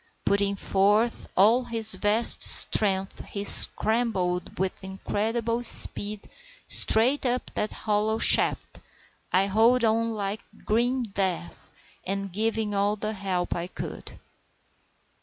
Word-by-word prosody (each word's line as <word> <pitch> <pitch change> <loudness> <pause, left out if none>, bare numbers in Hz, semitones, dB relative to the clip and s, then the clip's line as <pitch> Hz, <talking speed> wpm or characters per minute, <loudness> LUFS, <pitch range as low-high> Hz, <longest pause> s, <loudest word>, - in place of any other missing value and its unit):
Putting 200 0 0
forth 205 +4 -1
all 225 +7 +3
his 225 -2 +1
vast 215 +3 +4
strength 195 -2 +2
he 200 - -6
scrambled 205 -5 +2
with 190 +1 -4
incredible 225 +5 -4
speed 210 -3 +3 0.4
straight 245 +6 +3
up 250 -1 -3
that 210 - -3
hollow 215 +1 -3
shaft, - - +1 0.5
I 190 +2 +2
holding 225 +4 +1
on 230 +1 -2
like 205 0 -5 0.2
grim 245 +4 -1
death, 190 - -4 0.3
and 195 -1 -5
giving 220 0 -2
all 200 +1 -1
the 215 +1 -5
help 190 -3 -4
I 175 0 -5
could. - - -10
210 Hz, 115 wpm, -24 LUFS, 195-225 Hz, 0.5 s, vast